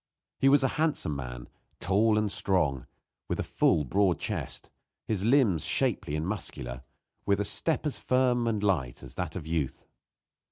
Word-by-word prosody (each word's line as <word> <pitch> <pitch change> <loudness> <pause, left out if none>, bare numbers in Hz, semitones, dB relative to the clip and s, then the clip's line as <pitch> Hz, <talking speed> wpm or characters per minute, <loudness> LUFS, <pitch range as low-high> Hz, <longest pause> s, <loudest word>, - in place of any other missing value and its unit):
He 135 - +5
was 140 0 +5
a - - +4
handsome 150 - +1
man, - - -6 0.3
tall 105 +4 +3
and 105 -2 +1
strong, 75 -13 0 0.4
with - - -2
a - - 0
full, 75 - +2
broad 95 +6 +2
chest; - - -4 0.3
his 105 -4 -1
limbs 115 - +3
shapely 75 - 0
and 75 +2 -2
muscular, 60 - -4 0.5
with 100 -1 +3
a 105 - 0
step 160 +10 +1
as 150 - -2
firm 125 -2 +2
and 110 -3 0
light 75 -12 0
as - - -8
that 90 -3 -4
of 90 -5 -5
youth. 80 -4 -2
95 Hz, 165 wpm, -29 LUFS, 75-115 Hz, 0.5 s, He